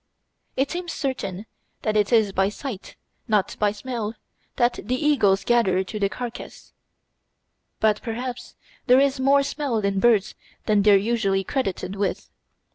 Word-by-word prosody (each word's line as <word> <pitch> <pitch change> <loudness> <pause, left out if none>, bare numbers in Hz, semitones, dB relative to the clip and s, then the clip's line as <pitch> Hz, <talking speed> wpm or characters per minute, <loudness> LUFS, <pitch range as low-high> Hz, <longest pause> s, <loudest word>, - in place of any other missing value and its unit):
It 270 +1 +1
seems 350 -1 -4
certain 225 - -4 0.4
that 215 -1 0
it 210 +1 +2
is 220 -4 +4
by 195 +1 +1
sight, 215 -2 -7 0.3
not 210 -4 +1
by 205 -1 +2
smell, 220 0 -5 0.4
that 240 0 +1
the 250 +5 -1
eagles 245 -9 +2
gather 195 -6 +2
to 210 +3 -6
the 200 -1 +1
carcass; 240 +2 -8 1.1
but 215 -1 +2
perhaps 245 +1 -5 0.3
there 250 +1 +6
is 275 -1 +2
more 275 +1 +4
smell 280 -4 -2
in 200 -2 0
birds 215 -2 +3 0.3
than 210 -1 +3
they 205 0 +5
are - - +7
usually 200 -2 0
credited 195 -6 -3
with. 200 0 -3
220 Hz, 150 wpm, -24 LUFS, 200-255 Hz, 1.1 s, are